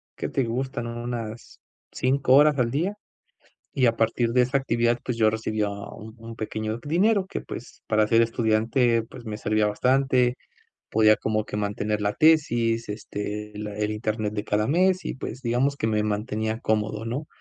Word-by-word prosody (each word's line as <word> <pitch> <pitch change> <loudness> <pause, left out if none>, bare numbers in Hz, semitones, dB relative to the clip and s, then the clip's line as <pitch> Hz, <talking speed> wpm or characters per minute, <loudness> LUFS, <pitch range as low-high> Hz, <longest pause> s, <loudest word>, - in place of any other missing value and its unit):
¿qué - - -4
te 135 - 0
gustan?, 120 0 -3
unas 120 -1 -6 0.3
5 130 0 +1
horas 145 +1 +6
al 115 -1 +1
día, 175 +10 -1 0.8
y 130 - +2
a 115 -1 +2
partir 115 +1 +1
de 125 - +4
esa 135 +3 +1
actividad, 120 -2 +1
pues, 125 - -2
yo 110 -1 +5
recibía 110 -1 -1
un 100 +2 -8
un 115 0 -9
pequeño 110 +1 -3
dinero 190 +6 +2
que, - - -4
pues, - - -9
para 110 -1 +2
ser 115 0 +5
estudiante, 115 +1 +2
pues, 120 +1 -12
me 105 -1 -4
servía 110 0 +1
bastante. 125 +3 +2 0.6
Podía 110 0 +5
como 110 -1 -1
que 105 - -6
mantener 105 +1 -1
la 105 0 0
tesis, 120 -8 +3
este, 105 0 -5
la 105 -1 -5
el 105 0 -1
internet 110 0 -2
de 105 - -3
cada 105 0 0
mes, 185 +4 +2
y, - - -3
pues, 130 0 -6
digamos 125 +4 +1
que 110 - -1
me 105 -1 +1
mantenía 110 +1 -2
cómodo, 110 0 -1
¿no? 125 +7 -4
115 Hz, 175 wpm, -25 LUFS, 110-125 Hz, 0.8 s, horas